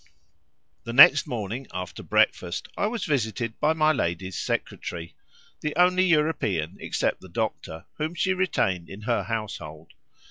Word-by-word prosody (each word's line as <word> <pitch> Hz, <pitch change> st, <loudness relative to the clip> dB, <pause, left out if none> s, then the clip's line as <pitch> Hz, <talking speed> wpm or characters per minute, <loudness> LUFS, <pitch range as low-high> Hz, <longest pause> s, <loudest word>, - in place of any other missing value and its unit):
The 115 Hz, -, -6 dB
next 145 Hz, +2 st, +8 dB
morning 120 Hz, +2 st, -4 dB
after 90 Hz, 0 st, -6 dB
breakfast 85 Hz, 0 st, +1 dB
I 205 Hz, -, 0 dB
was 225 Hz, -1 st, -3 dB
visited 115 Hz, -5 st, -2 dB
by 155 Hz, +1 st, +3 dB
my 155 Hz, -1 st, +3 dB
lady's 95 Hz, -, -2 dB
secretary—the 85 Hz, -, -5 dB
only 180 Hz, +1 st, +4 dB
European, 105 Hz, -, +1 dB
except -, -, -1 dB
the -, -, -13 dB
doctor, 80 Hz, 0 st, -4 dB
whom 155 Hz, +3 st, -2 dB
she 185 Hz, +3 st, +1 dB
retained 95 Hz, -, 0 dB
in 100 Hz, +2 st, -9 dB
her 120 Hz, +2 st, 0 dB
household. 95 Hz, -9 st, -6 dB
115 Hz, 135 wpm, -25 LUFS, -, -, next